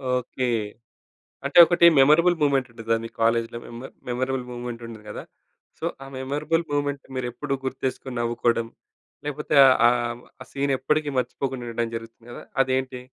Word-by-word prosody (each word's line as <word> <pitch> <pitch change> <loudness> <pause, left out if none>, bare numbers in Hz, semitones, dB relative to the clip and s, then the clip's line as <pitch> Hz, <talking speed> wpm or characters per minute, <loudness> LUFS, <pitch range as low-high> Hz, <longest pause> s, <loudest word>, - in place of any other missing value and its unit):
Okay. 125 +1 -2 1.0
అంటే 140 +5 +2
ఒకటి 170 +1 +5
memorable 170 +6 +5
movement 135 -3 +2
ఉంటదని 115 -1 -1
మీ - - -7
కాలేజీ‌లో, 115 +1 +1
మెమర్ 120 +3 -9 0.2
మెమరబుల్ 130 +1 -2
మూవ్‌మెంట్ 120 -1 -6
ఉంటది 110 -2 -11
గదా! - - -7 0.5
సో, - - -7 0.2
ఆ - - -8
మెమరబుల్ 150 +5 -1
మూవ్‌మెంట్‌ని 145 -1 -2
మీరు 130 -1 -2
ఎప్పుడూ 140 +2 -3
గుర్తు 130 0 -4
చేసుకొని 130 0 -4
నవ్వుకోవడం. 115 -1 0 0.6
లేకపోతే 150 +1 -3
ఆ! - - +7 0.2
ఆహ్, 120 0 -1 0.2
ఆ - - -11
సీన్ 140 0 0
ఎప్పటికీ 150 +3 0
మర్చిపోకుండా 125 0 -3
ఉండడం 115 0 -2
జరుగుతుంది 115 +1 -11
గదా! - - -9 0.2
అదేంటి? 130 -1 -2
130 Hz, 150 wpm, -24 LUFS, 120-140 Hz, 1.0 s, ఆ